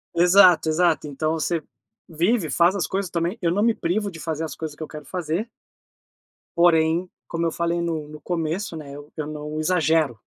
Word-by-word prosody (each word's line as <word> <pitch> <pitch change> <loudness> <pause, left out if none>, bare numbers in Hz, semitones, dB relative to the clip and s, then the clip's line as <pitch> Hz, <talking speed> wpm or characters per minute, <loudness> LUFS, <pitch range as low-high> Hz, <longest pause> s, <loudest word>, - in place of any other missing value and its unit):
Exato, 180 -1 +6
exato. 160 -1 +2
Então 155 +2 -1
você 165 +1 -1 0.5
vive, 175 +3 +1
faz 170 +7 +3
as 200 - -1
coisas 195 -1 -2
também 170 +5 -1
eu 170 -2 +1
não 200 +4 +1
me 230 0 +4
privo 200 +5 -1
de 165 -4 -10
fazer 160 0 -3
as 155 - -7
coisas 155 -2 -6
que - - -15
eu - - -6
quero 150 -1 -10
fazer 180 +5 -3 1.1
porém, 170 0 +4 0.2
como 165 0 -2
eu 165 - +1
falei 170 +1 -1
no 160 -3 -3
no 155 0 -10
começo, 170 +3 -3
né, 150 -3 -8
eu 145 +1 -11
eu 155 -2 -4
não 150 0 -5
exagero. 155 -6 +2
165 Hz, 190 wpm, -23 LUFS, 155-175 Hz, 1.1 s, Exato